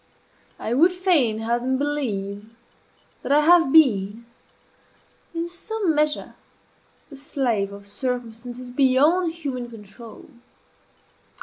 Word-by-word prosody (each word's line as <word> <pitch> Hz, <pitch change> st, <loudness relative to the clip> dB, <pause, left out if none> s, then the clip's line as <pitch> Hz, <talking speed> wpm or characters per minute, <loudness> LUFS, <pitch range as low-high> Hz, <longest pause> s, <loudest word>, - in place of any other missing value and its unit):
I 225 Hz, -, -3 dB
would 330 Hz, +8 st, +5 dB
fain 345 Hz, -, +2 dB
have 235 Hz, +2 st, -1 dB
them 260 Hz, +1 st, 0 dB
believe 215 Hz, -8 st, -3 dB, 0.7 s
that -, -, -4 dB
I 295 Hz, +1 st, +5 dB
have 330 Hz, -2 st, +5 dB
been, 225 Hz, -7 st, +3 dB, 1.1 s
in 335 Hz, +1 st, -2 dB
some 375 Hz, +1 st, -2 dB
measure, 300 Hz, 0 st, 0 dB, 0.8 s
the -, -, -9 dB
slave 250 Hz, -8 st, -1 dB
of 200 Hz, 0 st, -11 dB
circumstances 245 Hz, +2 st, -5 dB
beyond 290 Hz, +7 st, +3 dB
human 270 Hz, -7 st, -5 dB
control. 220 Hz, 0 st, -12 dB
260 Hz, 105 wpm, -23 LUFS, 225-305 Hz, 1.1 s, would